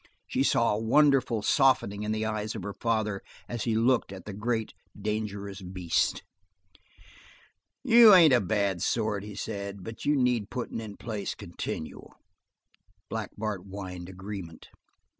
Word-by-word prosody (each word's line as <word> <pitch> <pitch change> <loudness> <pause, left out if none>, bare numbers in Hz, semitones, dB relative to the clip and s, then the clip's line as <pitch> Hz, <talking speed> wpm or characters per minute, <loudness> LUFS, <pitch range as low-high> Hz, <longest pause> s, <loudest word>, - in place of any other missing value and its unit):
She - - -1
saw - - +3
a 105 - -1
wonderful 130 -2 +3
softening 130 -7 +3
in 105 0 -2
the 110 0 -1
eyes 110 0 -3
of - - -5
her 100 - -4
father 110 -2 -1 0.3
as 120 -3 -4
he 115 -2 +1
looked 120 -1 +2
at 95 -2 -9
the 105 - -6
great, 110 +2 -2 0.3
dangerous 105 -2 -4
beast. 90 -2 -1 1.6
"You 230 -2 +8
ain't 165 -6 +7
a 125 - +5
bad 100 -3 0
sort," 110 -3 0
he 105 -1 -8
said, 100 -2 -5
"but 115 +3 -8
you 150 - +2
need 125 -5 +1
puttin' 125 -2 -4
in 105 -2 -8
place 110 -4 -4
continual." 80 - -7 1.0
Black 110 -2 -3
Bart 105 -3 -3
whined 95 -2 -7
agreement. 95 -3 -8
105 Hz, 145 wpm, -28 LUFS, 100-115 Hz, 1.6 s, You